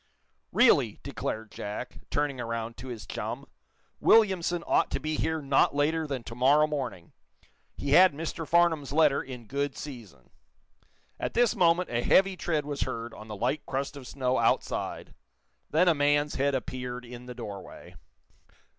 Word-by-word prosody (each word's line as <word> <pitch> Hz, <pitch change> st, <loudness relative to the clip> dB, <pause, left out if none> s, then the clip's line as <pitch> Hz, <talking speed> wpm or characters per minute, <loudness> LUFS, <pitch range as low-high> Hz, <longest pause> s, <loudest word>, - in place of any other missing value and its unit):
"Really," -, -, +4 dB
declared 110 Hz, 0 st, -4 dB
Jack, 105 Hz, +4 st, -6 dB
turning 145 Hz, -3 st, -1 dB
around 115 Hz, 0 st, -4 dB
to 130 Hz, -, -9 dB
his 120 Hz, -4 st, -7 dB
chum, -, -, -5 dB, 0.5 s
"Williamson 185 Hz, -6 st, +3 dB
ought -, -, +2 dB
to -, -, -2 dB
be 155 Hz, +1 st, -3 dB
here 160 Hz, -1 st, -1 dB
not 140 Hz, 0 st, +3 dB
later 155 Hz, +2 st, +1 dB
than 135 Hz, -4 st, -4 dB
to 115 Hz, -, -8 dB
morrow 140 Hz, +5 st, +4 dB
morning. 130 Hz, -, -5 dB, 0.6 s
He 140 Hz, -, -3 dB
had 185 Hz, +5 st, +8 dB
Mr. 160 Hz, +2 st, -5 dB
Farnum's 165 Hz, -5 st, +2 dB
letter 150 Hz, -2 st, +4 dB
in 125 Hz, -3 st, -9 dB
good 140 Hz, +3 st, -2 dB
season." 110 Hz, -, -10 dB, 0.9 s
At -, -, -3 dB
this 240 Hz, 0 st, +3 dB
moment 175 Hz, -, +3 dB
a 120 Hz, 0 st, 0 dB
heavy 195 Hz, +8 st, +4 dB
tread 160 Hz, -4 st, -1 dB
was 145 Hz, -1 st, -4 dB
heard 115 Hz, -2 st, -3 dB
on 110 Hz, -, -11 dB
the 105 Hz, -, -6 dB
light 130 Hz, +7 st, -1 dB
crust 135 Hz, +2 st, -3 dB
of 135 Hz, -3 st, -9 dB
snow 130 Hz, -1 st, 0 dB
outside. -, -, -1 dB, 0.6 s
Then 165 Hz, +4 st, +3 dB
a 170 Hz, -, +6 dB
man's 145 Hz, 0 st, +2 dB
head 140 Hz, 0 st, +1 dB
appeared 125 Hz, -1 st, -5 dB
in 120 Hz, +1 st, -10 dB
the 125 Hz, -, -7 dB
doorway. 100 Hz, -5 st, -9 dB
140 Hz, 160 wpm, -28 LUFS, 125-155 Hz, 0.9 s, had